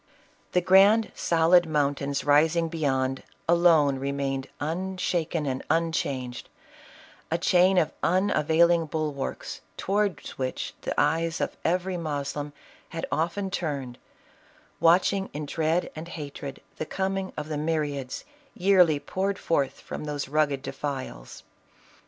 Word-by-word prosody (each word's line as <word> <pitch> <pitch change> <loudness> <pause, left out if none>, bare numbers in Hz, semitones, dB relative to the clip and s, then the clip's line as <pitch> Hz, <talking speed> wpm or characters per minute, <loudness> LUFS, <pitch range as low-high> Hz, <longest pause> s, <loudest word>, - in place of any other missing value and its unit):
The 180 - +4
grand 200 +5 +5
solid 170 +1 +4
mountains 140 -2 0
rising 160 +3 +3
beyond, 135 -5 0 0.3
alone 165 -5 +4
re 140 +1 -2
mained 135 -1 -2
unshaken 170 0 -2
and 130 -2 -2
unchanged, 140 -7 -1 0.8
a 165 - +1
chain 185 +2 +4
of 160 - +2
unavail 170 -3 +3
ing 165 -1 +1
bulwarks 150 -3 -4 0.2
towards 195 -8 -1
which 130 -1 -3
the - - -3
eyes 165 +2 +1
of - - -2
every 180 +2 0
Moslem 145 -2 -3 0.4
ha«l 165 - -5
often 175 +5 -1
turned, 140 -8 -3 0.8
watching 190 +3 +3
in 150 +1 -4
dread 160 +4 0
and 160 +2 -7
hatred 145 -4 -7 0.2
the 155 - -3
coining 190 +2 -2
of 150 - -4
the 155 - -3
myriads 145 -4 -2 0.3
yearly 180 -5 +4
poured 195 +5 -2
forth 140 -5 -1
from - - -6
those 145 -2 -3
rugged 145 -2 +1
defiles. 130 - -6
160 Hz, 120 wpm, -26 LUFS, 145-175 Hz, 0.8 s, grand